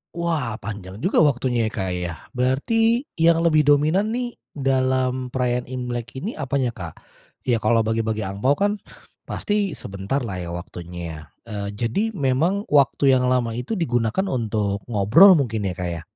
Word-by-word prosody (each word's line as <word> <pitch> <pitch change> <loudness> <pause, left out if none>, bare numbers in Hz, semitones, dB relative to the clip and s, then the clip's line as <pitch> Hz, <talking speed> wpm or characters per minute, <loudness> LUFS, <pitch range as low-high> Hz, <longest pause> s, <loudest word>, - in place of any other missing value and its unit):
Wah, 160 -10 -1
panjang 100 -2 -7
juga 185 - +3
waktunya 125 -6 +2
ya, 110 - -4
Kak, 95 -3 -2
ya. 90 -1 -3 0.2
Berarti 225 - +1 0.2
yang 165 0 +4
lebih 155 -3 +4
dominan 155 +8 +3
nih, 245 -1 -2 0.3
dalam 130 -1 +1
perayaan 125 -1 0
Imlek 125 -1 -5
ini 195 - -3
apanya, 135 -3 -1
Kak? 85 -7 -8 0.5
Ya, 120 -3 +1
kalau 115 +1 +3
bagi-bagi 110 -1 -1
angpao 100 +9 +1
kan, 205 +4 0 0.5
pasti 205 -4 -1
sebentarlah 100 +1 -4
ya, 85 -1 -5
waktunya 85 0 -8
ya. 75 -1 -8 0.3
Eee, 100 -1 -4
jadi 115 - -1
memang 160 +7 +1
waktu 140 -1 +4
yang 125 -1 +2
lama 125 -2 +1
itu 125 - -3
digunakan 120 - 0
untuk 105 -5 -1
ngobrol 120 - +7
mungkin 110 -8 0
ya, 90 - -2
Kak, 90 -1 -3
ya? 85 -2 -5
125 Hz, 155 wpm, -23 LUFS, 110-150 Hz, 0.5 s, ngobrol